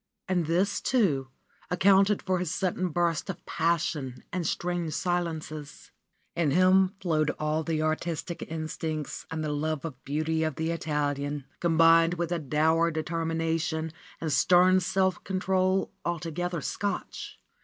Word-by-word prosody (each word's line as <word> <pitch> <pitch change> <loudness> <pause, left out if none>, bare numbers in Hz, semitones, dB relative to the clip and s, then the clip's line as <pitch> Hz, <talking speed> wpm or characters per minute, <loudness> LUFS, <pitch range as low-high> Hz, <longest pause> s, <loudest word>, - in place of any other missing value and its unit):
And 180 -4 0
this, 185 +5 +1
too, 165 - +2 0.4
accounted 195 +3 +4
for 185 -1 0
his 180 -2 -2
sudden 185 -1 -1
bursts 170 -1 0
of - - -6
passion 160 -6 -1
and 180 -3 -1
strange 175 -3 -2
silences. 160 -4 -3 0.4
In 170 -3 +2
him 185 +4 +4
flowed 155 -5 +1
all 155 +1 0
the 155 -1 -1
artistic 165 +2 -2
instincts 155 -1 -4
and 160 -1 -3
the 155 - -1
love 155 +1 -2
of 135 -5 -7
beauty 155 +3 0
of 155 -3 -1
the 160 +1 -1
Italian, 145 -3 -2
combined 165 0 +5
with 170 0 -2
a 175 - 0
dour 160 +3 +2
determination 165 0 -1 0.3
and 160 -3 -1
stern 185 +5 +5
self 190 +1 0
control 185 0 +1
altogether 170 0 -2
Scotch. 205 +7 -4
165 Hz, 135 wpm, -28 LUFS, 155-180 Hz, 0.4 s, combined